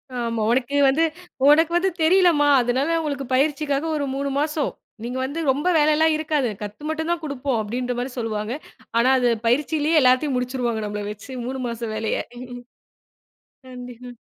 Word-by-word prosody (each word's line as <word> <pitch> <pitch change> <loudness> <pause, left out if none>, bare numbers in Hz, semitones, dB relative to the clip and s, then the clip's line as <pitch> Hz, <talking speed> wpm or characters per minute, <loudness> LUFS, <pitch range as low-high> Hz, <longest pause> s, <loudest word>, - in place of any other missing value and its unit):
ஆமா. 230 -2 -2
உனக்கு 265 +3 0
வந்து, 315 +5 +2 0.5
உனக்கு 325 +3 +5
வந்து 380 +2 +2
தெரிலம்மா. 335 -4 +4
அதனால 270 +7 0
உங்களுக்கு 285 -3 -3
பயிற்சிக்காக 285 +1 0
ஒரு 285 -1 -1
3 280 0 -2
மாசம். 300 0 -1 0.3
நீங்க 250 +2 -4
வந்து 290 +5 -4
ரொம்ப 290 +6 -2
வேலைலாம் 310 +1 +3
இருக்காது. 300 -6 0
கத்து 210 +7 -7
மட்டுந்தான் 320 +2 -2
குடுப்போம். 275 -4 -2
அப்படின்ற 245 +3 -3
மாரி 250 +1 -3
சொல்லுவாங்க. 220 0 -3 0.4
ஆனா, 245 +3 +4
அது 245 -1 +2 0.2
பயிற்சியிலேயே 300 +5 +2
எல்லாத்தையும் 255 +2 +3
முடிச்சிடுவாங்க, 245 -3 -2
நம்மள 210 0 -4
வச்சு 210 +6 -11
3 260 +1 -4
மாச 235 0 -6
வேலய. 220 0 -1 1.5
கண்டிப்பா. 250 -1 -9
270 Hz, 145 wpm, -22 LUFS, 245-305 Hz, 1.5 s, உனக்கு